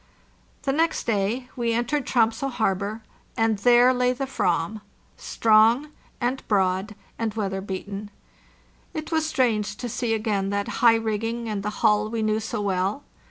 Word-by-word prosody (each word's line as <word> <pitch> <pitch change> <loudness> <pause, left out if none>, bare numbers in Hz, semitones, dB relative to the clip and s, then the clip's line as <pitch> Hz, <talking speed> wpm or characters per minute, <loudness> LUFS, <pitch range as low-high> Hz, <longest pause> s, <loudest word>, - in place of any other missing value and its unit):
The 275 - +1
next 325 +4 0
day 225 +4 0
we 235 -2 0
entered 245 +5 -1
Tromso 230 +2 +2
harbor, 215 -3 -1 0.3
and 225 -2 +2
there 245 +3 +5
lay 250 0 +2
the 270 +2 -3
"vam, 195 -4 -1 0.3
strong 225 +6 +3 0.3
and 255 +2 -1
broad 190 +1 +1 0.2
and 225 -2 -2
weather 195 -3 -2
beaten. 200 +1 -6 0.9
It 310 +1 -5
was 320 -1 +1
strange 220 -9 0
to 245 - -4
see 230 0 -1
again 210 -3 -1
that 200 0 -3
high 235 -1 +7
rigging 225 +1 -2
and 210 -2 -2
the 210 - -2 0.2
hull 210 0 +3
we 225 -1 -2
knew 215 0 +1
so 220 0 -3
well. 195 +6 -1
220 Hz, 155 wpm, -24 LUFS, 205-245 Hz, 0.9 s, high